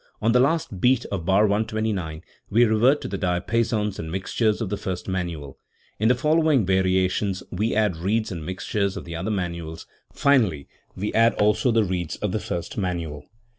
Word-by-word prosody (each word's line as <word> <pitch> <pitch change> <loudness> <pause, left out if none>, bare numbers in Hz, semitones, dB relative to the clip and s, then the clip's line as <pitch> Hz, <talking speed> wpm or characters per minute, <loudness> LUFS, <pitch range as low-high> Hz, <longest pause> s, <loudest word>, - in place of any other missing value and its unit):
On 115 - +2
the 125 - +4
last 135 - 0
beat 125 -1 +3
of 95 -5 -3
bar 95 +2 +4
129 105 -6 -1 0.3
we 115 +4 +5
revert 120 +6 +3
to - - -4
the 100 0 -4
diapasons 105 +3 0
and 80 -1 -5
mixtures 105 +4 0
of 110 -5 -3
the 105 - -1
first 95 -3 -5
manual; 85 -7 -4 0.4
in 110 - +2
the 125 - +4
following 155 - +3
variations 95 +1 +1
we 105 +5 -1
add 105 -5 +1
reeds 105 +6 -1
and 85 -4 -5
mixtures 95 +3 -2
of - - -7
the 85 -1 -6
other 95 +5 -3
manuals; 85 -5 -4 0.3
finally 110 - +2 0.3
we 105 +3 -3
add 115 +1 +4
also 105 +4 +2
the 115 -2 +3
reeds 90 -4 -2
of 105 - -3
the 110 - -1
first 85 +1 -4
manual. 85 -6 -3
100 Hz, 180 wpm, -24 LUFS, 90-110 Hz, 0.4 s, we